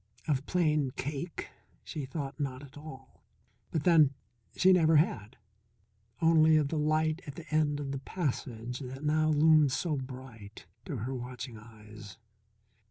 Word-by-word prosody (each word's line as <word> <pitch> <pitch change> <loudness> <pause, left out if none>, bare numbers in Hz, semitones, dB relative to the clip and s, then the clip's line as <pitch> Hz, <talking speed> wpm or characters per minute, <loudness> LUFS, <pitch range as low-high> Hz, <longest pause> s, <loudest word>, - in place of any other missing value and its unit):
Of 140 -2 0
Plain 155 -6 +2
Cake 145 +4 -5 0.3
she 150 -3 -5
thought 140 0 -5
not 135 -1 -3
at 140 -1 -14
all. 140 -3 -12 0.5
But 155 - -2
then, 155 -6 +5 0.4
she 185 0 +5
never 165 -3 +4
had. 110 - +1 0.9
Only 160 -1 +6
of 150 -2 +1
the 160 - -1
light 155 +2 +1
at 140 - -7
the 165 - -10
end 150 -2 +2
of 140 -2 -4
the 135 - -3
passage 125 -6 -4
that 135 +1 -7
now 155 +1 +2
loomed 155 -1 +5
so 155 +2 -1
bright 125 -5 -9 0.2
to 170 -7 -4
her 120 +5 -4
watching 125 -1 -6
eyes. 105 -1 -13
145 Hz, 150 wpm, -30 LUFS, 130-155 Hz, 0.9 s, Only